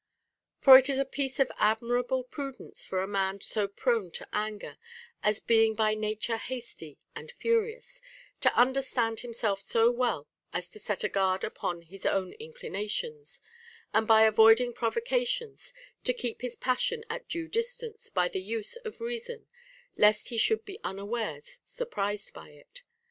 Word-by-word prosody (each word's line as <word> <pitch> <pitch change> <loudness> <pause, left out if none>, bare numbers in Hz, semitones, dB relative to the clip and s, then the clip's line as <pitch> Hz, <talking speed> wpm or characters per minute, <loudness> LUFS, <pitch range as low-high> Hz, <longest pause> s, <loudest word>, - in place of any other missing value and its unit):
For 260 -1 +11
it 265 +1 -1
is 275 - +1
a 275 - +1
piece 270 0 -3
of 270 - +3
admirable 245 +4 +1
prudence 275 +1 -6
for 185 0 -2
a - - -3
man 195 -1 -1
so 210 0 -1
prone 220 -1 0
to - - -7
anger, 210 0 -4 0.4
as 210 0 +2
being 225 -1 +3
by 215 0 +2
nature 215 +1 -2
hasty 235 - -7 0.2
and - - -8
furious, 465 +1 -1 0.4
to - - +4
under 260 +2 +4
stand 230 -4 -1
himself 225 -4 -2
so 225 +4 +3
well 240 - -1 0.3
as 175 0 -3
to 215 - -13
set 210 -1 -2
a - - +2
guard 190 -2 +1
upon 170 -1 -3
his 185 +3 -13
own 190 -1 0
inclinations, 450 - -5 0.5
and 220 0 +3
by 220 -1 +7
avoiding 225 +2 +6
provocations 470 - -1 0.3
to 250 - +1
keep 245 -2 -4
his 250 -1 -4
pas 255 0 0
sion 470 -2 -1
at 485 +2 -6
clue 335 -1 -3
distance 465 +1 -2
by 180 -2 +2
the 185 - -3
use 220 - -3
of 460 -3 -9
reason, 475 0 -5 0.5
lest 210 0 +4
he 235 - -3
should 445 - +2
be 400 +1 -8
unawares 225 - -4
surprised 205 - -3
by - - -12
it. 150 - -15
235 Hz, 160 wpm, -29 LUFS, -, 0.5 s, For